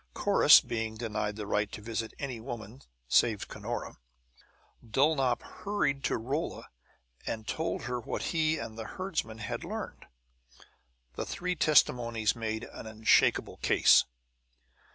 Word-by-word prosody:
Corrus - - +7
being 110 -1 -3
denied 105 -2 -3
the 105 -1 -5
right 105 0 0
to - - -6
visit 110 +1 -4
any 130 -5 -5
woman 115 +1 -8 0.3
save 110 - +2
Cunora, - - -5 0.9
Dulnop 135 +1 +2
hurried 150 -10 -2
to - - +1
Rolla 135 +8 -4 0.6
and 110 -1 -4
told 160 +1 -2
her 120 0 -2
what 115 - -4
he 160 -1 +2
and 110 0 -7
the 110 - -5
herdsman 185 - -3
had 105 - -5
learned. - - -6 1.1
The - - -4
three 180 0 -2
testimonies 115 -8 +3
made 110 -1 -3
an - - -9
unshakable 110 0 +2
case. - - +5
115 Hz, 130 wpm, -30 LUFS, 110-140 Hz, 1.1 s, Corrus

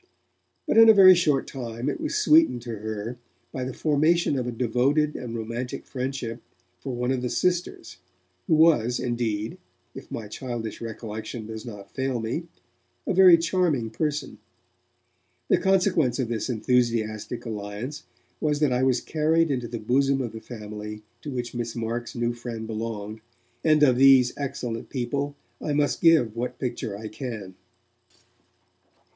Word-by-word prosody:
But - - +2
in 225 0 +9
a 220 - +8
very 190 -2 +9
short 150 -6 +2
time 120 -2 -5
it - - -2
was 310 -1 -2
sweetened 320 - +4
to 120 - -6
her 110 +2 -5 0.3
by 130 - -4
the 130 - -3
formation 155 +3 +2
of 125 -2 -2
a - - -2
devoted 130 +6 +1
and 120 -2 -5
romantic 115 +2 -5
friendship 125 -3 -4 0.4
for 130 -2 -5
one 125 +1 -1
of 130 -2 0
the 125 - -2
'sisters', 175 - -1 0.5
who - - +4
was, 150 -7 +4
indeed, 115 -3 -2 0.3
if - - -10
my 110 -2 -5
childish 115 -1 -5
recollection 110 0 -6
does 110 +2 -7
not 105 -4 -9
fail 130 -2 -2
me, 120 +10 -3 0.6
a - - 0
very 185 -2 +8
charming 165 - 0
person. 150 +3 -3 1.1
The - - +4
consequence 180 -10 +2
of 130 -4 -1
this 115 +1 -2
enthusiastic 115 -1 0
alliance 110 +5 -5 0.4
was 150 -1 0
that 150 -4 +2
I 125 - +1
was 130 -2 +2
carried 160 +1 +1
into 125 -3 -2
the 120 - -5
bosom 135 +5 +1
of 120 -4 -3
the 110 - -9
family 105 -2 -8 0.2
to - - -7
which 120 -3 -4
Miss 120 -1 -4
Marks' 115 +1 -4
new 120 0 0
friend 120 -2 -6
belonged, 110 -1 -5 0.4
and 155 -2 +4
of 130 -4 +5
these 130 -2 +6
excellent 130 -5 -4
people 140 +3 -2 0.3
I 150 - -2
must 145 0 +1
give 155 -10 +4
what 120 +2 -3
picture 120 -5 -4
I 110 +1 -7
can. 110 -4 -6
125 Hz, 155 wpm, -25 LUFS, 115-145 Hz, 1.1 s, in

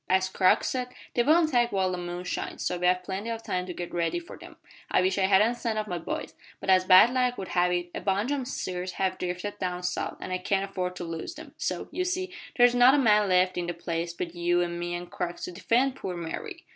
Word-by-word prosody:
As 190 0 +3
Crux 185 0 +3
said, 250 -1 -2 0.3
they 240 - +3
won't 315 +5 +4
attack 240 -4 +2
while 190 -2 +1
the 180 - -2
moon 175 0 -5
shines, 180 - -4
so 180 - -1
we 180 - +2
have 180 0 +2
plenty 195 +4 -4
of 225 0 -4
time 180 -3 -2
to 180 - -5
git 175 -1 -6
ready 170 - 0
for 345 0 -8
them. - - -13 0.3
I - - +3
wish 190 +2 +1
I 190 - +3
hadn't 210 +5 +4
sent 225 -2 -2
off 215 - -1
my 175 -2 -3
boys, 165 - -5 0.3
but 190 - 0
as 185 0 +5
bad 185 +6 +8
luck 250 -1 +1
would 190 - -6
have 180 0 +2
it 175 0 -2
a - - -4
bunch 200 +7 0
o' 285 - 0
my - - -3
steers 185 -7 -4
have 185 0 -1
drifted 180 +3 -4
down 180 -1 -3
south, 180 0 -2
an' - - -6
I 185 - -1
can't 195 +1 0
afford 180 -2 -3
to 180 - -6
lose 165 - -5
them - - -11
so, - - -3
you 365 - -1
see, 365 +1 -2 0.2
there's 245 -1 +6
not 245 +2 +6
a - - +3
man 210 -6 +4
left 185 0 +3
in 175 - -3
the 175 - -3
place 170 0 -3
but 170 0 -5
you 175 0 +1
an' 170 0 -4
me 175 0 -3
an' 175 0 -5
Crux 175 0 -5
to - - -4
defend 245 +8 +1
poor 180 -2 -5
Mary." 165 -1 -6
185 Hz, 260 wpm, -27 LUFS, 175-230 Hz, 0.3 s, bad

